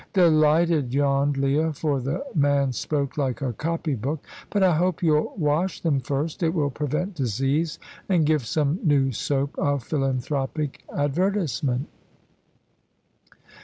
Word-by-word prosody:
"Delighted," 155 -5 +3
yawned 140 0 +2
Leah, 145 +4 +1
for 145 -2 -1
the 135 - -3
man 140 -3 +2
spoke 140 +3 -2
like 130 -3 -1
a 125 -3 -1
copy 165 +3 -2
book; 135 +5 -3 0.2
"but 200 -2 +1
I 180 -3 +4
hope 180 +2 0
you'll 155 -2 +2
wash 165 +3 0
them 150 -5 +1
first. 140 +6 -3
It 165 +1 +1
will 145 -4 +1
prevent 150 +8 -2
disease, 135 - -1 0.3
and 175 -5 +3
give 150 -3 +2
some 150 +5 0
new 140 -5 +3
soap 140 +4 -1
a 145 -1 +1
philanthropic 135 +2 -2
advertisement." 145 - 0
145 Hz, 130 wpm, -24 LUFS, 135-160 Hz, 0.3 s, I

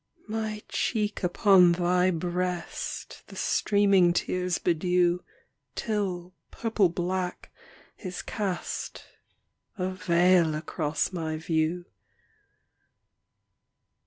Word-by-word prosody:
My 215 -1 -3
cheek 210 -3 -1
upon 180 -1 +5
thy 180 +1 +2
breast 180 +1 -3
The - - -12
streaming 195 -4 +3
tears 180 0 0
bedew, 180 +1 +2 0.6
Till, 185 -5 -2 0.2
purple 220 -5 +1
black, 180 +1 -3 0.5
is 185 -3 -6
cast 195 -5 -4 0.7
A 185 -1 -1
veil 175 -2 +3
across 155 +2 -2
my 160 -3 -3
view. 160 +2 -1
180 Hz, 80 wpm, -27 LUFS, 175-190 Hz, 0.7 s, upon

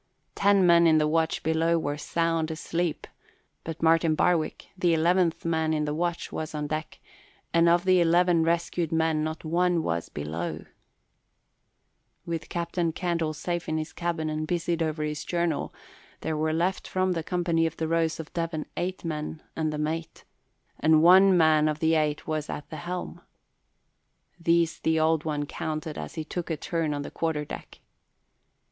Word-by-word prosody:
Ten 200 -2 +4
men 170 -1 +6
in 160 -1 +5
the 150 0 +3
watch 160 +1 0
below 160 +1 +2
were 145 -3 -2
sound 165 +1 -1
asleep 165 +1 -2 0.6
but 165 0 -6
Martin 165 -1 +4
Barwick, 165 -2 0
the 175 -3 +2
eleventh 170 +1 +2
man 160 -1 +1
in 150 0 0
the 150 - -2
watch, 170 +2 -2
was 155 0 -5
on 150 0 -2
deck, 155 +1 -4 0.5
and 170 0 +5
of 175 +2 +3
the 185 -1 +5
eleven 175 0 +4
rescued 170 0 0
men 160 -1 +1
not 160 +1 -4
one 175 +1 +1
was 85 - -2
below. 80 +2 -5 1.6
With 165 -2 -4
Captain 170 -1 -1
Candle 165 -2 -1
safe 175 +2 -3
in 160 - 0
his 155 0 -4
cabin 170 -2 -2
and 155 0 -2
busied 170 -1 -1
over 155 -1 -1
his 150 -1 -3
journal, 170 -3 -1 0.5
there 160 0 -2
were 155 +1 0
left 175 +4 -1
from 185 0 0
the 170 -2 -1
company 170 -1 +1
of 160 - -7
the 160 - -1
Rose 165 0 0
of 160 - -8
Devon 165 -2 -2
eight 180 0 -3
men 155 0 -4
and 155 -1 -1
the 150 - -4
mate, 160 +2 -3 0.6
and 155 0 +4
one 185 +2 +7
man 155 -2 +4
of 150 -1 0
the 160 +1 +2
eight 150 -2 0
was 155 -1 -3
at 150 - -5
the 155 - -5
helm. 175 +4 -5 1.2
These 170 0 +2
the 160 0 +1
Old 160 0 +2
One 150 -2 -1
counted 155 +1 -4
as - - -7
he 160 - -3
took 175 +2 -5
a 160 - -1
turn 165 0 -2
on 145 - -3
the - - -8
quarter 160 -3 -2
deck. - - -9
160 Hz, 175 wpm, -27 LUFS, 155-170 Hz, 1.6 s, one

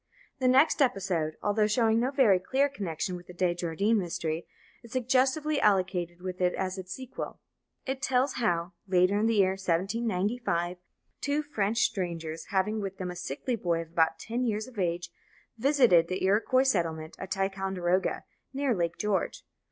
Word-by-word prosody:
The 255 - +2
next 270 +5 +4
episode, 185 - 0
although 210 +1 +2
showing 225 +1 +3
no 250 +2 +1
very 255 -9 +4
clear 270 +9 +1
connection 185 - -3
with 175 0 -10
the 180 - -11
De 175 -1 +1
Jardin 175 +6 +1
mystery, 165 -2 -3 0.3
is 235 -2 -15
suggestively 265 +4 +1
allocated 180 -3 +1
with 185 0 -5
it 180 0 +2
as 190 0 -3
its 185 0 -8
sequel. 260 +2 -7 0.5
It 265 0 -3
tells 260 +1 +2
how, 175 -3 0
later 185 +2 +3
in 220 - +2
the 230 - +2
year 190 -2 +4
1795, 190 0 -1 0.4
two 290 +2 0
French 225 -6 0
strangers, 170 -6 -2
having 210 +3 0
with 195 -1 -5
them 180 -1 -4
a - - -8
sickly 180 - -3
boy 175 -6 0
of 165 - -19
about 165 -1 +2
ten 235 +3 -3
years 215 -3 -1
of 240 -5 -10
age, 170 -1 -1 0.5
visited 245 - +5
the 185 +1 -3
Iroquois 220 +7 +3
settlement 165 -10 -1
at 190 - -6
Ticonderoga, 190 -2 -1 0.3
near 275 -2 +1
Lake 170 -4 -1
George. 210 -2 -1
195 Hz, 165 wpm, -29 LUFS, 175-235 Hz, 0.5 s, visited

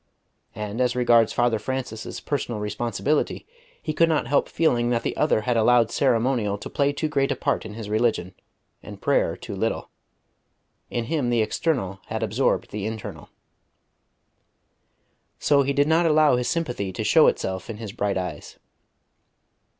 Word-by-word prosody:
And 105 +3 -4
as 125 -1 +1
regards 120 -2 +4
Father 120 -2 +1
Francis's 120 -1 -5
personal 125 -6 -3
responsibility, 115 +8 -1 0.3
he 155 - -4
could 165 +2 +3
not 155 -2 +1
help 140 +4 +1
feeling 120 -7 +1
that 120 -1 0
the - - -2
other 150 -7 +2
had 120 +2 0
allowed 115 0 +4
ceremonial 120 -5 +1
to - - -9
play 140 0 +2
too 150 +2 -2
great 140 -2 0
a - - +1
part 115 - -1
in 105 - -9
his 110 -2 -6
religion, 110 -4 0 0.5
and - - -10
prayer - - +1
too - - -7
little. - - -2 1.0
In 120 - -2
him 145 -1 -1
the 120 -2 +2
external 110 - -1
had 110 0 -3
absorbed 110 +5 0
the 105 0 -3
internal. 110 -1 -7 2.1
So 145 -1 +3
he 140 0 0
did 140 +1 +2
not 165 +2 +3
allow 155 -3 +5
his 125 0 -1
sympathy 125 - -2
to - - -3
show - - +5
itself 95 +1 -1
in 110 - -5
his 110 -2 -7
bright 100 -3 -1
eyes. 90 -5 -6
120 Hz, 160 wpm, -24 LUFS, 110-140 Hz, 2.1 s, allow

